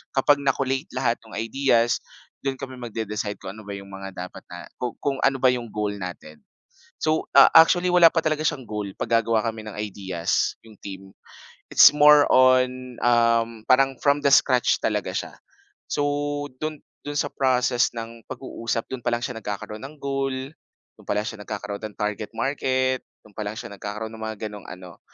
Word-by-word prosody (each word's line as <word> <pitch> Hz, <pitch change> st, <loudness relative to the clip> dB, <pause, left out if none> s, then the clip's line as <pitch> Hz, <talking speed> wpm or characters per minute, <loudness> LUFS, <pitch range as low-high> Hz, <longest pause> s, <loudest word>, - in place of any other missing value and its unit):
kapag 145 Hz, +2 st, +4 dB
na-collate 135 Hz, +1 st, 0 dB
lahat 125 Hz, -2 st, 0 dB
ng 110 Hz, -, -11 dB
ideas, 115 Hz, +1 st, +1 dB, 0.4 s
do'n 135 Hz, -1 st, -1 dB
kami 130 Hz, -1 st, -8 dB
magde-decide 110 Hz, -2 st, -4 dB
kung 95 Hz, -, -5 dB
ano 110 Hz, -1 st, -12 dB
ba 100 Hz, -, -5 dB
yung 100 Hz, 0 st, -10 dB
mga 95 Hz, 0 st, -7 dB
dapat 90 Hz, 0 st, -7 dB
na 90 Hz, -1 st, -9 dB
kung 125 Hz, -2 st, -3 dB
kung 140 Hz, -1 st, 0 dB
ano 135 Hz, 0 st, +3 dB
ba 130 Hz, -, +5 dB
yung 120 Hz, -2 st, -3 dB
goal 105 Hz, -1 st, -3 dB
natin. 85 Hz, -4 st, -8 dB, 0.6 s
So, 155 Hz, 0 st, +1 dB
ah, 140 Hz, -, +9 dB
actually, 175 Hz, +2 st, +6 dB
wala 175 Hz, -1 st, +7 dB
pa 165 Hz, -, +2 dB
talaga 155 Hz, -1 st, -1 dB
siyang 130 Hz, -5 st, -1 dB
goal, 105 Hz, -2 st, -4 dB
'pag 115 Hz, -, +2 dB
gagawa 115 Hz, -1 st, +1 dB
kami 110 Hz, -1 st, -8 dB
ng 110 Hz, -, -7 dB
ideas, 95 Hz, -5 st, -1 dB
yong 110 Hz, -3 st, -17 dB
team, 95 Hz, -1 st, -8 dB, 0.6 s
it's -, -, +10 dB
more 150 Hz, 0 st, +7 dB
on, 130 Hz, -1 st, +3 dB
um, 115 Hz, -2 st, +2 dB
parang 135 Hz, 0 st, +4 dB
from 145 Hz, 0 st, +3 dB
the 140 Hz, -, +3 dB
scratch 130 Hz, -2 st, +4 dB
talaga -, -, -1 dB
siya. -, -, -3 dB, 0.6 s
So, 145 Hz, -, 0 dB, 0.6 s
do'n 155 Hz, -1 st, -3 dB, 0.3 s
do'n 145 Hz, 0 st, -4 dB
sa 145 Hz, -, 0 dB
process 125 Hz, -2 st, +2 dB
ng 115 Hz, 0 st, -8 dB
pag-uusap, 115 Hz, -3 st, -4 dB
do'n 130 Hz, -, -5 dB
pa 120 Hz, -, +1 dB
lang 120 Hz, -, -1 dB
siya 125 Hz, -3 st, -5 dB
nagkakaroon 105 Hz, +1 st, -6 dB
ng 145 Hz, +3 st, -9 dB
goal, 135 Hz, -1 st, -1 dB, 0.6 s
do'n -, -, -17 dB
pa -, -, -1 dB
lang 105 Hz, -, -1 dB
siya 110 Hz, -4 st, -6 dB
nagkakaroon 105 Hz, 0 st, -6 dB
ng -, -, -28 dB
target 105 Hz, 0 st, -3 dB
market, 130 Hz, +1 st, 0 dB, 0.2 s
do'n 105 Hz, -2 st, -20 dB
pa 105 Hz, -, -2 dB
lang 105 Hz, +1 st, -4 dB
siya -, -, -7 dB
nagkakaroon 105 Hz, +2 st, -5 dB
no'ng 110 Hz, 0 st, -6 dB
mga 110 Hz, 0 st, -5 dB
gano'ng 105 Hz, -2 st, -10 dB
ano, 90 Hz, -2 st, -11 dB
120 Hz, 185 wpm, -24 LUFS, 105-135 Hz, 0.6 s, it's